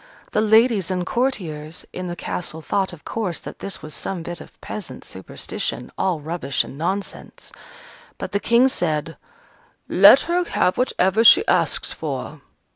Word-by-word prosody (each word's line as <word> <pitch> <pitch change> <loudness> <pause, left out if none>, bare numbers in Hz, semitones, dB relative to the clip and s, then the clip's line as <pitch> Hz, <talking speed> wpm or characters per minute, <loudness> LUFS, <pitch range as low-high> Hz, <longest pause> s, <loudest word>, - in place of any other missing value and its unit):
The 215 - +2
ladies 220 -3 +4
and 180 -1 -1
courtiers 175 - -2
in 185 0 -5
the 175 - -4
castle 160 -2 -5
thought, 195 +4 0
of 175 -4 -13
course, 200 -7 -2
that - - -9
this 195 - -6
was 155 - -8
some 180 -4 -4
bit 175 +1 -6
of - - -15
peasant 170 -12 -7
superstition, 95 0 -5
all 185 -4 0
rubbish 150 -4 -1
and - - -10
nonsense. 190 +6 -4 0.7
But - - -5
the 200 - 0
King 235 +4 +4
said, 165 - -1 0.7
"Let - - +8
her 350 +1 0
have 185 - +1
whatever 220 -4 +2
she 375 - +8
asks - - +1
for." - - -5
185 Hz, 155 wpm, -22 LUFS, 165-220 Hz, 0.7 s, Let